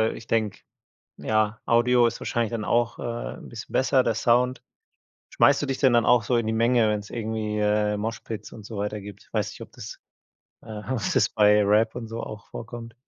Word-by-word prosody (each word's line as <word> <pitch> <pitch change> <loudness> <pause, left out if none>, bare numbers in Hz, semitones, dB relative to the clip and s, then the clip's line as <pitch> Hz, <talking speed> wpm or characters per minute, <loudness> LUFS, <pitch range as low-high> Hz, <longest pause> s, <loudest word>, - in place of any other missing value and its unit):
ich 115 - -11
denke, 110 -3 0 0.6
ja, 110 0 0
Audio 120 +1 +4
ist - - -3
wahrscheinlich 115 -2 -1
dann 115 -2 -3
auch, 120 +1 +1
äh, - - -7 0.3
'n - - -12
bisschen 120 +2 -9
besser, 130 0 +3
der 115 -2 0
Sound. 125 +3 +2 0.7
Schmeißt 140 0 +4
du - - -1
dich 135 -1 -2
denn 130 -3 +4
dann 120 -2 +4
auch 120 -3 +4
so 125 - 0
in 115 - 0
die 110 - 0
Menge, 115 0 +3
wenn's 105 -1 -2
irgendwie, 110 -2 -3
äh, 105 0 +1
Moshpits 110 0 -5
und 110 - -11
so 110 0 -7
weiter 105 +1 -3
gibt? 100 -1 -12
Weiß - - -1
nicht, - - -12
ob - - -10
das, - - -9 0.6
äh 110 -2 -8
ob's 120 -6 -1
das - - +3
bei 105 0 +4
Rap 105 +3 +3
und 120 -2 -5
so 115 +1 -5
auch 105 -1 -8
vorkommt? 115 0 -8
110 Hz, 205 wpm, -25 LUFS, 105-120 Hz, 0.7 s, Audio